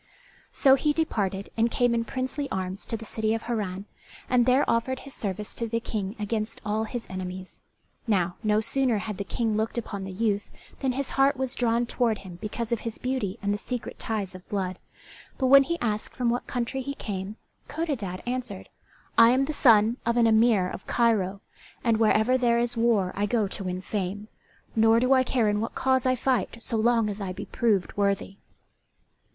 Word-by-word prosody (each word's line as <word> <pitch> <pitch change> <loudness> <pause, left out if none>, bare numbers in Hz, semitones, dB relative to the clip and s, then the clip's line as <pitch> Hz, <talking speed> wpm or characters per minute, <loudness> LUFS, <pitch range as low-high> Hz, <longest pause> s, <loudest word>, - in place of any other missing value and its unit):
So 270 -2 +5
he 295 +2 +2
departed 200 - -1
and 230 +1 +2
came 245 0 +2
in 230 0 0
princely 260 +3 -3
arms 190 +1 -4
to 225 - -2
the 225 - -9
city 220 0 -1
of 225 - -5
Harran, 205 -5 -3 0.4
and 250 -1 +3
there 260 +3 +4
offered 245 +3 0
his 275 - -10
service 205 0 -4
to 230 - -3
the 230 +1 -1
King 210 -3 -4
against 215 +1 -3
all 215 +1 0
his 235 +1 -5
enemies. 185 0 -7 0.5
Now, 180 -5 +1
no 215 -1 +2
sooner 240 +1 +1
had 210 -1 -5
the - - -1
King 220 +2 -1
looked 220 +2 -1
upon 205 -4 -4
the 190 - -6
youth 205 +1 -1 0.3
than 265 -2 0
his 275 +1 -3
heart 275 +1 +3
was 260 -1 -2
drawn 235 -1 +1
toward 235 -2 0
him 185 -3 -11
because 220 +2 -4
of 235 - +1
his 230 -1 -5
beauty 250 -6 -2
and 200 0 +1
the 205 - -3
secret 245 +1 -5
ties 205 -4 -3
of 185 0 -12
blood, 185 -3 -2 0.6
but 265 - 0
when 275 +2 +8
he 340 +5 -1
asked 215 -3 -2
from 245 -2 +1
what 245 - -2
country 250 +2 -2
he 280 +2 -4
came, 200 -2 -5 0.3
Codadad 275 - -3
answered, 250 +1 -4 0.5
"I 230 0 +9
am 260 +3 +3
the 305 - -3
son 225 -3 +5
of 235 +1 0
an 235 - +5
emir 220 -4 +4
of 185 - -8
Cairo, 205 -5 +1 0.4
and 230 -2 +3
wherever 220 +3 +3
there 235 -2 +3
is 240 0 0
war 225 -5 +2
I 205 +1 0
go 215 -1 +1
to 195 - -3
win 180 0 -3
fame, 205 +2 -4 0.5
nor 225 +1 +5
do 255 +2 +3
I 260 -1 +5
care 245 -3 +1
in 210 0 +1
what 225 - -4
cause 260 -1 +2
I 255 - +3
fight 245 -3 0
so 230 0 -2
long 230 0 +3
as 205 0 -4
I 185 -2 -3
be 200 +2 -6
proved 200 -3 0
worthy." 200 -1 0
225 Hz, 200 wpm, -26 LUFS, 200-245 Hz, 0.6 s, I